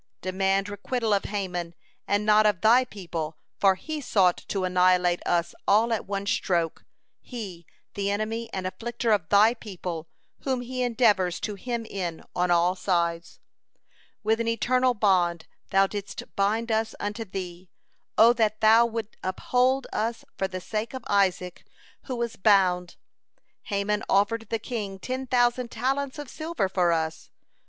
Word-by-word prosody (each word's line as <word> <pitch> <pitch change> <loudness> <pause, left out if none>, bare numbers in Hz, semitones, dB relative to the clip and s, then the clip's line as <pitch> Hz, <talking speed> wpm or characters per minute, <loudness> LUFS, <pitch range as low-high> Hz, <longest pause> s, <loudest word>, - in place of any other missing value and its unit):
Demand 195 +1 0
requital 215 +2 -1
of 200 - +1
Haman 180 -4 -3 0.3
and 205 +1 +1
not 215 0 +5
of 205 -3 0
Thy 235 +5 +6
people, 165 -8 -6 0.2
for 195 -1 +5
he 310 +9 -5
sought 190 -8 +3
to 195 -2 -2
annihilate 180 -1 +3
us 170 -1 +1
all 225 +3 +4
at 220 - -3
one 200 0 -3
stroke, 170 -5 0 0.4
he, 195 -9 -8 0.3
the 200 0 -1
enemy 220 +3 -2
and 190 -1 -4
afflicter 235 +4 -2
of 195 -7 +1
Thy 210 +3 +6
people, 180 -8 -6 0.3
whom 260 -2 -1
he 255 +1 -4
endeavors 220 -7 +2
to 210 - -3
hem 235 +3 -4
in 180 -6 -4
on 180 0 +1
all 175 +1 +3
sides. 170 -3 -1 0.8
"With 220 +1 +2
an 230 - -1
eternal 250 +2 +2
bond 180 -5 +2 0.2
Thou 195 0 +4
didst 205 0 -6
bind 220 +4 +1
us 220 0 0
unto 205 +2 -3
Thee. 185 -3 -7 0.5
O 230 +2 +7
that 215 -2 +1
Thou 225 +2 +6
wouldst 225 -2 -5
uphold 250 +8 +1
us 225 +1 -2
for 190 - -1
the 185 -1 -5
sake 220 +6 -4
of 260 - -6
Isaac, 185 -3 +1 0.4
who 260 - -4
was 235 -1 -3
bound. 185 -3 +3 0.7
Haman 205 +1 -1
offered 225 +3 +2
the 225 - 0
king 210 -4 -5
ten 260 +6 -4
thousand 245 0 +2
talents 270 +5 -2
of 295 -1 -6
silver 315 - -2
for 180 -2 +2
us. 160 -1 -2
205 Hz, 155 wpm, -26 LUFS, 185-230 Hz, 0.8 s, O